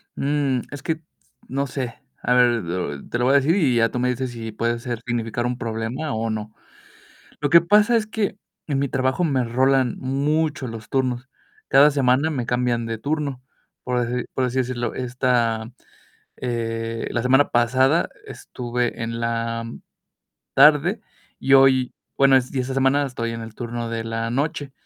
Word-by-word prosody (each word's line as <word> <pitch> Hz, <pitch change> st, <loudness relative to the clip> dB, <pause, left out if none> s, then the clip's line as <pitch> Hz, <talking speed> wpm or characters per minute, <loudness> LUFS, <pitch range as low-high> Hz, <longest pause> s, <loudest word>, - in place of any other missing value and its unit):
Mm, 140 Hz, -3 st, 0 dB
es 145 Hz, +1 st, -8 dB
que 165 Hz, -2 st, -2 dB, 0.5 s
no 140 Hz, +2 st, -2 dB
sé. 125 Hz, -2 st, -4 dB, 0.3 s
A 125 Hz, -, +1 dB
ver, 125 Hz, 0 st, +6 dB, 0.2 s
lo 85 Hz, -5 st, -4 dB
te -, -, -2 dB
lo 120 Hz, -, +1 dB
voy 135 Hz, -, +4 dB
a -, -, +5 dB
decir 145 Hz, +5 st, +2 dB
y 145 Hz, -11 st, +2 dB
ya 115 Hz, 0 st, +3 dB
tú 125 Hz, -, -3 dB
me 125 Hz, +1 st, +1 dB
dices 125 Hz, 0 st, -2 dB
si 115 Hz, -2 st, -6 dB
puede 115 Hz, +2 st, -1 dB
ser 120 Hz, -2 st, -5 dB
significar 120 Hz, -1 st, -2 dB
un 125 Hz, 0 st, -2 dB
problema 115 Hz, +6 st, -3 dB
o 115 Hz, +1 st, -2 dB
no. 110 Hz, 0 st, -4 dB, 0.9 s
Lo 145 Hz, -, 0 dB
que 170 Hz, +3 st, +7 dB
pasa 210 Hz, +6 st, +4 dB
es 220 Hz, -2 st, +1 dB
que 215 Hz, -3 st, -2 dB, 0.3 s
en 140 Hz, -3 st, 0 dB
mi 140 Hz, -, +1 dB
trabajo 130 Hz, +5 st, 0 dB
me 135 Hz, -6 st, +1 dB
rolan 130 Hz, +1 st, +2 dB
mucho 145 Hz, +2 st, 0 dB
los 115 Hz, -2 st, -8 dB
turnos. 130 Hz, -1 st, -1 dB, 0.4 s
Cada 145 Hz, +2 st, +6 dB
semana 140 Hz, +2 st, +2 dB
me 130 Hz, -6 st, -2 dB
cambian 120 Hz, -1 st, 0 dB
de 115 Hz, 0 st, -3 dB
turno, 140 Hz, 0 st, -3 dB, 0.4 s
por 125 Hz, -1 st, 0 dB
deci 125 Hz, +1 st, -2 dB
por 130 Hz, -, 0 dB
así 125 Hz, +1 st, -3 dB
decirlo. 120 Hz, -1 st, -2 dB
Esta, 120 Hz, -3 st, 0 dB, 0.7 s
eh, 115 Hz, -2 st, -3 dB
la 120 Hz, -, -1 dB
semana 135 Hz, +3 st, +4 dB
pasada 130 Hz, +6 st, +3 dB, 0.2 s
estuve 120 Hz, -1 st, -4 dB
en 115 Hz, 0 st, -3 dB
la 115 Hz, 0 st, -2 dB, 0.9 s
tarde, 150 Hz, -, +5 dB, 0.4 s
y 135 Hz, -, -1 dB
hoy 130 Hz, -1 st, +5 dB, 0.2 s
bueno, 135 Hz, -1 st, +5 dB
es 130 Hz, +1 st, 0 dB
y 130 Hz, -, +1 dB
esta 130 Hz, +1 st, -3 dB
semana 135 Hz, +2 st, +3 dB
estoy 115 Hz, -3 st, -3 dB
en 115 Hz, -, -5 dB
el 110 Hz, -1 st, -9 dB
turno 120 Hz, -1 st, -4 dB
de 115 Hz, -1 st, -3 dB
la 115 Hz, 0 st, -3 dB
noche. 140 Hz, +1 st, -2 dB
125 Hz, 175 wpm, -22 LUFS, 115-140 Hz, 0.9 s, que